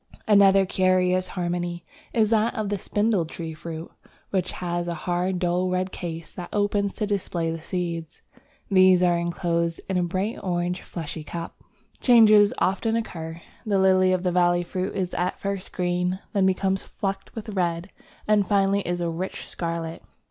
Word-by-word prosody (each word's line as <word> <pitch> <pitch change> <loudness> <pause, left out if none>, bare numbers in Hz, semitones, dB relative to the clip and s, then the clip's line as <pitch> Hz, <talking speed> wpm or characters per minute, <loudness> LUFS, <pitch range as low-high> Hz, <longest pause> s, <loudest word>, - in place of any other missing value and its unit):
Another 200 -2 +6
very - - +1
curious 185 0 +2
harmony 175 -1 -3 0.3
is 220 -2 +2
that 225 +1 +2
of 215 -2 -2
the 205 -1 -1
Spindle 205 -1 +1
tree 165 0 -6
fruit, 160 +1 -7 0.4
which 185 -2 0
has 175 -1 -3
a 170 - -2
hard 180 +3 -1
dull 180 +1 0
red 185 +1 -1
case 165 -2 -6
that 180 -2 -7
opens 205 -1 +1
to 215 - -1
display 180 -5 -1
the 165 0 -5
seeds: 170 -2 -4 0.4
these 185 -2 +5
are 175 -1 +4
enclosed 170 -1 -1
in 190 - 0
a 180 - +2
bright 190 +6 -2
orange 180 -1 -1
fleshy 160 -2 -6
cup. 170 +2 -6 0.4
Changes 215 -4 +6
often 220 +4 +1
occur. 165 -7 -5 0.2
The 210 -4 +1
Lily 185 -1 +4
of 185 -1 +1
the 180 - +1
Valley 175 0 +3
fruit 185 +2 -3
is 185 -2 -2
at 180 +1 -1
first 195 -1 -4
green, 180 0 0 0.2
then 195 -2 +3
becomes 190 0 +1
flecked 195 -2 -5
with 220 -1 -6
red, 180 -2 -1 0.4
and 210 -2 +3
finally 200 0 +3
is 175 -1 -2
a 170 - 0
rich 180 +3 -5
scarlet. 165 -1 -4
185 Hz, 170 wpm, -25 LUFS, 175-195 Hz, 0.4 s, Another